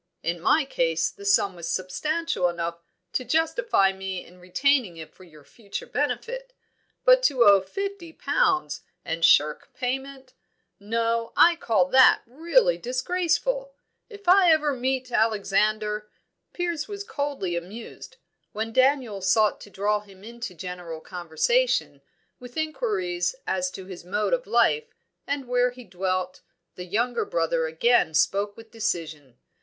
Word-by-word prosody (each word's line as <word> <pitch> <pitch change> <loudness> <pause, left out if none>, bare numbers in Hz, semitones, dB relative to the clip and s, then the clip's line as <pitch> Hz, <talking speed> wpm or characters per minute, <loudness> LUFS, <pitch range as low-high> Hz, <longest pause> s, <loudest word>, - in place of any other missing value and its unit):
In 170 +1 -2
my 305 - +3
case 165 -10 0
the 200 - -13
sum 200 -1 +3
was 170 -1 -6
substantial 300 - -1
enough 170 0 -4 0.3
to 255 - 0
justify 320 - +2
me 190 -1 -5
in 180 +1 -18
retaining 205 +1 +1
it 160 -1 -10
for - - -17
your 155 -4 -17
future 225 - -8
benefit. - - -3 0.5
But - - +7
to 260 -4 +4
owe 200 -2 +7
fifty 390 - -5
pounds, 395 0 0 0.2
and 165 0 -3
shirk 150 -1 +3
payment 265 +1 -4 0.5
no, 230 +2 -1
I 340 0 +7
call 220 - +2
that 260 +4 +6
really 340 - +2
disgraceful. 360 - -1 0.3
If 410 -4 -13
ever 335 -5 +5
I - - -4
meet 260 0 -1
Alexander 210 0 +1 0.2
!" - - -53
Piers 345 -4 -2
was 405 -1 -6
coldly 280 - -3
amused. 215 - -8 0.4
When 220 +2 -4
Daniel 255 -6 +2
sought 210 +3 +2
to - - -11
draw 205 +1 0
him 195 -2 -17
into 235 -4 -7
general 175 -2 -7
conversation, 180 - 0 0.4
with 245 +1 -11
inquiries 360 +4 -1
as 275 0 -1
to 190 - -8
his 185 -2 -9
mode 205 - -1
of - - -1
life, 460 0 +2 0.3
and 280 -2 -3
where 245 0 +2
he 250 0 -12
dwelt, 185 -2 -3 0.3
the 180 - -8
younger 235 +6 0
brother 165 -1 0
again 160 +1 +2
spoke 200 +6 +1
with 225 -1 -14
decision. 155 - -4
230 Hz, 140 wpm, -25 LUFS, -, 0.5 s, But